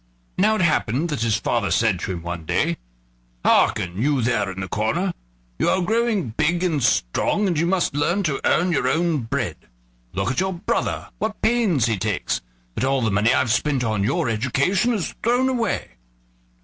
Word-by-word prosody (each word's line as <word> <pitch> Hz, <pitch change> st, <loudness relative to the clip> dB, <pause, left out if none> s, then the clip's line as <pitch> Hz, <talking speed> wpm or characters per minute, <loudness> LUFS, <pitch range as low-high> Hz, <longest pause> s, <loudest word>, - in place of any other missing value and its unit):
Now 215 Hz, +3 st, +3 dB
it 215 Hz, -, -1 dB
happened 150 Hz, -1 st, +1 dB
that 150 Hz, -5 st, -3 dB
his 115 Hz, -1 st, +2 dB
father 115 Hz, -2 st, -1 dB
said 110 Hz, -6 st, +2 dB
to 95 Hz, -, -4 dB
him 85 Hz, -2 st, -5 dB
one 85 Hz, -1 st, -5 dB
day: -, -, 0 dB, 0.7 s
"Hearken, 90 Hz, +3 st, +2 dB
you 140 Hz, -2 st, +1 dB
there 110 Hz, -4 st, +1 dB
in 95 Hz, 0 st, -6 dB
the 95 Hz, -, -4 dB
corner; 155 Hz, -, -1 dB, 0.5 s
you -, -, +2 dB
are 190 Hz, -, +2 dB
growing 220 Hz, -, 0 dB
big 160 Hz, +9 st, 0 dB
and 160 Hz, -6 st, 0 dB
strong, 115 Hz, -, +1 dB
and 175 Hz, -6 st, 0 dB
you 170 Hz, -, +1 dB
must 180 Hz, -4 st, +1 dB
learn 170 Hz, +7 st, +1 dB
to 150 Hz, -6 st, -1 dB
earn 180 Hz, +1 st, +2 dB
your 155 Hz, -, +1 dB
own 165 Hz, -2 st, +1 dB
bread. 115 Hz, -3 st, -3 dB, 0.6 s
Look 95 Hz, +6 st, -1 dB
at 130 Hz, -, -1 dB
your 190 Hz, +1 st, 0 dB
brother, 175 Hz, -, -2 dB
what 220 Hz, 0 st, -3 dB
pains 215 Hz, -, +2 dB
he 110 Hz, -4 st, 0 dB
takes; 105 Hz, -1 st, -1 dB, 0.3 s
but 110 Hz, -, -3 dB
all 135 Hz, -1 st, +1 dB
the 110 Hz, -, +1 dB
money 105 Hz, +4 st, +3 dB
I've 120 Hz, -, +2 dB
spent 130 Hz, +3 st, +1 dB
on 110 Hz, -3 st, 0 dB
your 145 Hz, -, 0 dB
education 135 Hz, -, +1 dB
is 195 Hz, -, -3 dB
thrown 245 Hz, +3 st, +2 dB
away." 235 Hz, -6 st, -1 dB
140 Hz, 190 wpm, -22 LUFS, 110-180 Hz, 0.7 s, Now